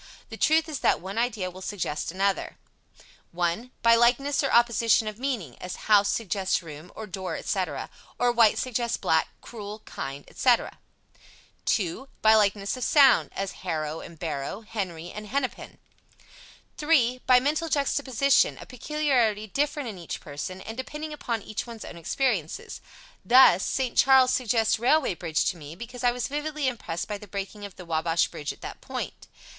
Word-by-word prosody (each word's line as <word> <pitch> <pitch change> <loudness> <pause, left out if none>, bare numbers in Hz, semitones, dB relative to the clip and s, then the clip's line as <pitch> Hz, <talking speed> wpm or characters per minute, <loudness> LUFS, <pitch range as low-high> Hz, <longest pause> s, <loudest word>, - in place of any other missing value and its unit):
The - - -7
truth 320 +1 +3
is 300 -4 -4
that - - +2
one 195 +5 -4
idea 215 -6 -1
will 185 +1 -11
suggest 175 -7 -3
another: 195 +2 -1 0.8
1. 175 +8 -1
By 230 0 +7
likeness 245 +5 +3
or 275 - 0
opposition 235 -2 +4
of 215 +1 -5
meaning, 240 - -3
as 180 - -5
"house" 205 -2 +5
suggests 195 -4 -1
"room" 155 +2 -10
or 220 - -6
"door," 190 -1 -5
etc.; - - -2 0.3
or, 245 0 +3
"white" 230 -3 +4
suggests 240 -2 -1
"black"; 160 0 +2
"cruel," 215 -2 -8
"kind," 140 +1 -6
etc. 245 -3 +1 0.9
2. 200 +7 -1 0.2
By 220 0 +7
likeness 205 -1 +2
of 255 - -5
sound, 275 -2 +5
as 195 -1 -2
"harrow" 160 -3 -3
and 170 - -11
"barrow"; 155 +4 -4
"Henry" 185 -6 -5
and 210 0 -8
"Hennepin." 265 +2 -3 1.0
3. 255 -5 +3
By 255 -1 +7
mental 305 +5 0
juxtaposition, 280 -2 +2
a - - -9
peculiarity 250 -6 0
different 290 +5 -1
in 205 -5 -7
each 170 - -6
person, 155 +6 -6
and 220 - -7
depending 300 +4 -6
upon 235 -7 -3
each 215 - -5
one's 230 -2 -8
own 170 - -9
experiences. 190 - -2 0.4
Thus, 240 -7 +7
"St. 260 -3 -1
Charles" 260 -1 +6
suggests 225 -3 +1
"railway 265 +1 +3
bridge" 165 -3 -1
to 180 - -13
me, 150 0 -9
because 240 +5 -8
I 245 - +4
was 245 -1 -3
vividly 295 0 -2
impressed 215 -9 -3
by 210 -1 -4
the 210 - -11
breaking 200 +1 -6
of 200 - -10
the 180 - -10
Wabash 165 0 +1
bridge 145 - -5
at - - -14
that - - -8
point. - - -6
220 Hz, 165 wpm, -26 LUFS, 185-255 Hz, 1.0 s, By